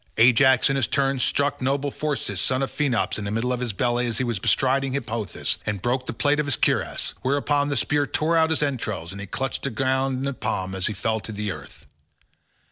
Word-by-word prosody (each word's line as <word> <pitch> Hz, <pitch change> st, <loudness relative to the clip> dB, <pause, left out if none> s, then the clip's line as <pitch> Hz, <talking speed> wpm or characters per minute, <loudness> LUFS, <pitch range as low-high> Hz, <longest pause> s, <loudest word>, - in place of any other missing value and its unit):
Ajax 125 Hz, +2 st, +6 dB
in 135 Hz, -1 st, +1 dB
his 130 Hz, -6 st, +1 dB
turn 135 Hz, +2 st, +1 dB
struck 145 Hz, +2 st, +1 dB
noble 140 Hz, +2 st, 0 dB
Phorcys 150 Hz, 0 st, -2 dB
son 130 Hz, 0 st, +1 dB
of 135 Hz, -, -3 dB
Phaenops 135 Hz, -7 st, 0 dB
in -, -, -5 dB
the 100 Hz, -, -3 dB
middle 115 Hz, +4 st, 0 dB
of 125 Hz, -, -2 dB
the 125 Hz, -2 st, -2 dB
belly 120 Hz, +4 st, 0 dB
as 115 Hz, -2 st, -2 dB
he 130 Hz, -, 0 dB
was 120 Hz, -5 st, -2 dB
bestriding 135 Hz, +6 st, +2 dB
Hippothous, 115 Hz, -6 st, -2 dB
and 105 Hz, -1 st, -2 dB
broke 125 Hz, +5 st, -1 dB
the -, -, -1 dB
plate 145 Hz, +5 st, +1 dB
of 150 Hz, -, 0 dB
his 140 Hz, -, +2 dB
cuirass; -, -, 0 dB
whereon 145 Hz, +2 st, +1 dB
the 140 Hz, -, 0 dB
spear 145 Hz, +4 st, +1 dB
tore 160 Hz, +2 st, 0 dB
out 160 Hz, -1 st, +4 dB
his 160 Hz, -2 st, +1 dB
entrails 105 Hz, -, -3 dB
and 100 Hz, +1 st, -7 dB
he 100 Hz, -, -6 dB
clutched 135 Hz, +7 st, -3 dB
the 140 Hz, -, -1 dB
ground 130 Hz, +2 st, 0 dB
in 135 Hz, -, -3 dB
his 140 Hz, -1 st, -2 dB
palm 95 Hz, 0 st, -2 dB
as 95 Hz, -1 st, -1 dB
he -, -, -1 dB
fell 110 Hz, +2 st, -1 dB
to 105 Hz, 0 st, -4 dB
earth. 70 Hz, -6 st, -10 dB
130 Hz, 225 wpm, -24 LUFS, 110-140 Hz, -, Ajax